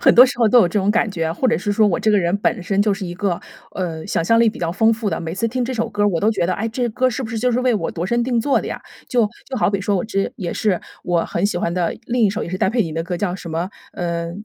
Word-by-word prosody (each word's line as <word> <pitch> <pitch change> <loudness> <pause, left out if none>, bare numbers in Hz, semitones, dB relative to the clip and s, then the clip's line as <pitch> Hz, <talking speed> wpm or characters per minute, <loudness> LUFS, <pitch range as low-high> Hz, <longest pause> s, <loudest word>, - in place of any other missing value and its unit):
很 - - +5
多 250 - +10
时 245 - -5
候 235 - +4
都 245 - +6
有 185 - +5
这 190 - 0
种 200 +1 +2
感 220 0 +1
觉， 165 -3 -2
或 255 +8 0
者 - - +3
是 205 -1 -1
说 215 0 +4
我 180 - +1
这 220 - +2
个 210 - +4
人 175 +1 +1
本 205 -1 0
身 195 +2 0
就 210 -1 +2
是 195 -1 -4
一 175 - -6
个， 180 -2 -1 0.3
呃， 165 -4 -4
想 - - 0
象 230 +5 +4
力 230 -1 +5
比 - - -11
较 170 - -1
丰 220 +6 +3
富 225 -1 -2
的。 - - -2
每 165 0 -4
次 230 +4 0
听 250 +2 -1
这 255 - -3
首 230 -2 -1
歌 205 - -2
儿， 205 - +4
我 170 -5 -1
都 215 - +3
觉 205 -5 0
得， 180 - +1
哎， 220 +5 -2
这 240 +2 -1
歌 255 +4 +1
儿 255 - +3
是 260 +3 -3
不 220 - -5
是 225 - -2
就 250 +3 +1
是 245 +1 +1
为 250 -2 +2
我 180 -6 -1
度 170 - -4
身 235 +5 +1
定 245 -1 0
做 275 +4 +2
的 - - -6
呀。 - - -5 0.3
就 240 -3 +3 0.2
就 265 - -5
好 210 - +2
比 200 -1 -1
说， 200 0 0
我 180 - -1
这 195 -3 -1
也 175 -4 -4
是 200 -5 0 0.2
我 175 -2 +1
很 170 - -2
喜 205 - -2
欢 170 -1 -1
的， 175 -2 -1
另 245 -1 0
一 210 - +5
首 210 +4 -3
也 - - -7
是 185 - -3
戴 - - +2
佩 230 +3 +2
妮 165 -5 -5
的 165 +1 -2
歌， 175 +1 -3
叫 180 0 -1
什 180 -3 -8
么 170 +4 -2 0.2
呃， 170 -1 -3
205 Hz, 370 characters per minute, -20 LUFS, 175-230 Hz, 0.3 s, 多